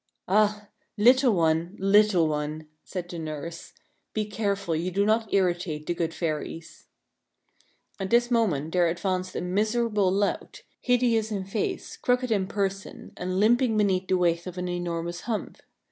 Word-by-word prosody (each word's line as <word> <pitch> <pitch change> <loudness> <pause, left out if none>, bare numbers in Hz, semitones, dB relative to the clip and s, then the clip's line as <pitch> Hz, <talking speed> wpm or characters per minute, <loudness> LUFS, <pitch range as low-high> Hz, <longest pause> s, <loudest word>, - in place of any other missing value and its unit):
" - - -60
Ah! 210 +1 +2 0.3
little 250 +4 +5
one, 165 +2 +1
little 195 -3 +4
one," 150 +1 -3 0.2
said 180 -2 -6
the 175 -1 -7
nurse, 160 +1 -6 0.2
" - - -48
be 215 -1 0
careful 200 -4 -2
you 170 +3 -1
do 200 +3 +1
not 220 0 +1
irritate 175 -5 0
the 175 - -1
good 165 -1 -2
fairies." 165 0 -5 1.1
At 190 -1 -3
this 240 +2 +3
moment 170 - +1
there 175 -1 +4
advanced 185 +2 -2
a - - -2
miserable 210 +1 +1
lout, 200 +1 -2 0.2
hideous 240 -3 +2
in 195 -3 -3
face, 195 +2 -3
crooked 250 0 0
in 195 -3 +1
person, 195 0 -4
and 185 +1 -2
limping 230 +1 +3
beneath 190 -3 +1
the 185 - +2
weight 170 0 +1
of 180 0 -7
an 180 0 -3
enormous 175 -1 -3
hump. 225 -3 -4
190 Hz, 160 wpm, -26 LUFS, 170-215 Hz, 1.1 s, little